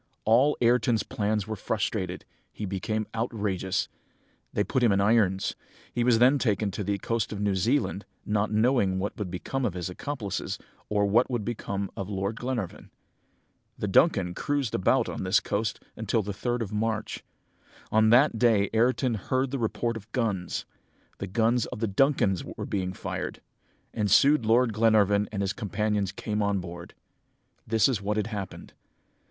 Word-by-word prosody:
"All 125 +7 +4
Ayrton's 120 -2 +3
plans 105 -1 -1
were 110 +1 -4
frustrated! 95 -3 -2 0.3
He 105 - -5
became 105 +3 -2
outrageous. 105 -5 -1 0.6
They 105 - +1
put 130 - -1
him 120 -3 +4
in 100 - +3
irons. 100 -2 +2 0.4
He 120 - +1
was 120 -2 +4
then 130 +4 +5
taken 105 -4 +1
to 100 +2 -4
the 100 0 -1
coast 115 +2 -2
of 105 - -4
New 100 -1 +1
Zealand, 105 +1 0 0.2
not 105 0 0
knowing 110 -3 +2
what 100 +2 -3
would 100 -3 -3
become 115 +9 -3
of 105 -7 -1
his 90 0 -4
accomplices, 110 -1 -4 0.3
or 105 -1 +2
what 110 +5 +3
would 120 -5 -2
become 100 -4 -3
of 95 0 -5
Lord 100 +2 -2
Glenarvan. 120 -7 -4 0.9
"The 105 - -2
Duncan 95 - +3
cruised 140 +1 -1
about 90 - +2
on - - -4
this 95 0 +3
coast 105 +2 -2 0.2
until 110 0 0
the 100 +1 -4
3rd 120 +4 -2
of 105 -1 -7
March. 110 0 -2 0.7
On 110 0 +4
that 120 0 +5
day 110 -5 +3
Ayrton 125 +2 +2
heard 130 +5 -1
the 140 - -2
report 115 +1 -1
of 110 0 -9
guns. 100 -8 -1 0.5
The 100 - -4
guns 115 +4 +1
of - - -7
the 115 - +1
Duncan 105 -2 +3 0.2
were - - -4
being 95 -2 -2
fired, 95 - -5 0.5
and 105 -2 0
soon 140 +8 +5
Lord 115 +1 +3
Glenarvan 105 -2 +3
and 100 -2 -2
his 95 0 -1
companions 105 -2 -1
came 105 +1 -3
on 100 -1 +1
board. 85 0 -9 0.7
"This 110 -2 +4
is 125 -7 -1
what 105 +1 -1
had 105 - +1
happened. 105 -4 -6
105 Hz, 170 wpm, -27 LUFS, 100-115 Hz, 0.9 s, then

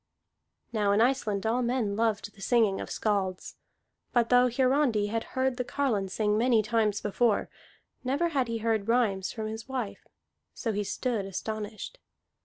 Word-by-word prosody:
Now 205 -2 +2
in 205 - +3
Iceland 225 -5 +1
all 235 +3 +1
men 235 -4 0
loved 215 -2 0
the 200 - -16
singing 220 -4 +2
of - - -6
skalds; 195 -4 -2 0.5
but 235 -2 +2
though 250 0 +5
Hiarandi 255 -4 +2
had 225 +1 -1
heard 260 -1 +1
the 250 - 0
carline 235 -8 -1
sing 210 +2 +1
many 235 -2 +3
times 215 -1 +1
before, 210 +1 +1 0.5
never 280 +7 +1
had 270 -6 0
he 230 0 -2
heard 220 -2 0
rhymes 220 -6 +1
from 220 -2 -5
his 220 +3 -6
wife. 250 -6 -4 0.5
So 230 - -2
he 205 +1 -1
stood 225 0 -2
astonished. 215 - -5
225 Hz, 160 wpm, -28 LUFS, 210-250 Hz, 0.5 s, though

